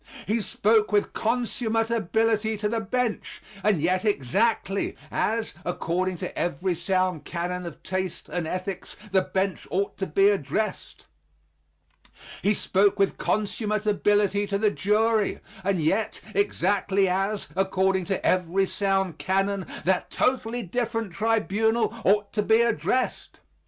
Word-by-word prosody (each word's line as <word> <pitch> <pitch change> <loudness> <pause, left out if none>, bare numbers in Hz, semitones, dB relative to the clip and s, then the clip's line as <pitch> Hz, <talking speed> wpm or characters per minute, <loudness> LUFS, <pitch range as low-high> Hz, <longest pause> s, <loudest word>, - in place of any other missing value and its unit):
He 220 +3 0
spoke 215 +1 +2
with 205 -1 +1
consummate 225 -1 0
ability 220 0 +1
to 210 +1 -1
the 225 +2 -1
bench, 225 +1 -2 0.2
and 205 -4 +3
yet 180 +4 +1
exactly 200 - 0
as, 225 +1 -1
according 180 +1 -1
to 180 - -5
every 175 +2 -1
sound 180 -2 0
canon 175 +2 -3
of 170 - -10
taste 185 -1 -3
and 175 -3 -3
ethics, 185 +2 -4
the 190 -1 +4
bench 190 0 -2
ought 200 +2 -1
to 190 - -1
be 195 +6 +4
addressed. 200 +3 -2 1.4
He 205 +1 +2
spoke 200 +1 +2
with 195 -1 +1
consummate 215 0 -1
ability 205 -1 +2
to 200 0 0
the 210 0 +2
jury, 215 +1 +1 0.2
and 195 -1 +1
yet 195 +8 0
exactly 200 -1 +1
as, 195 +3 -1
according 190 -1 +1
to 195 0 -2
every 185 +1 +2
sound 190 -1 0
canon, 195 0 0 0.2
that 185 0 +1
totally 245 -2 0
different 225 0 -2
tribunal 220 +2 +1
ought 205 +1 +2
to 210 - +1
be 220 +2 +4
addressed. 235 +3 -1
200 Hz, 130 wpm, -26 LUFS, 185-220 Hz, 1.4 s, the